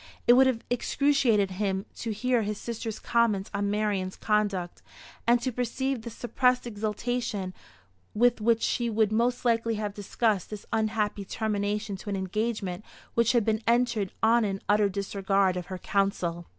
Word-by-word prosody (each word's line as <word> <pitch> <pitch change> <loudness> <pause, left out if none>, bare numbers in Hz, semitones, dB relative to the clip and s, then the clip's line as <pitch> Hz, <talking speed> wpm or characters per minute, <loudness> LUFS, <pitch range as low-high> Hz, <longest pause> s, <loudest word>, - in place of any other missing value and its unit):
It 240 - +7
would 260 +2 +6
have 240 -3 0
excruciated 245 -6 +2
him 190 0 -1
to 230 - -4
hear 245 +3 +1
his 210 0 -2
sister's 225 -1 -5
comments 225 -5 +1
on 200 0 0
Marian's 205 -3 -1
conduct, 205 -5 -1 0.5
and 240 +1 +5
to 255 - 0
perceive 250 +2 -2
the 235 - -6
suppressed 250 +2 +1
exultation 215 -2 -3 0.6
with 240 +1 +3
which 230 +1 +2
she 240 -1 0
would 215 -1 +2
most 240 +3 +1
likely 230 -1 +2
have 210 -1 -3
discussed 205 -1 -1
this 210 -2 -7
unhappy 215 -2 0
termination 210 0 -2
to 205 - -8
an 200 - -1
engagement 195 -1 -2 0.3
which 235 +1 +3
had 235 -4 +3
been 220 0 +1
entered 235 -5 +2
on 230 +1 +5
in 195 -2 -1
utter 205 0 +3
disregard 195 -1 0
of 180 -1 -5
her 185 - -5
counsel. 180 -4 -1
215 Hz, 160 wpm, -27 LUFS, 200-235 Hz, 0.6 s, It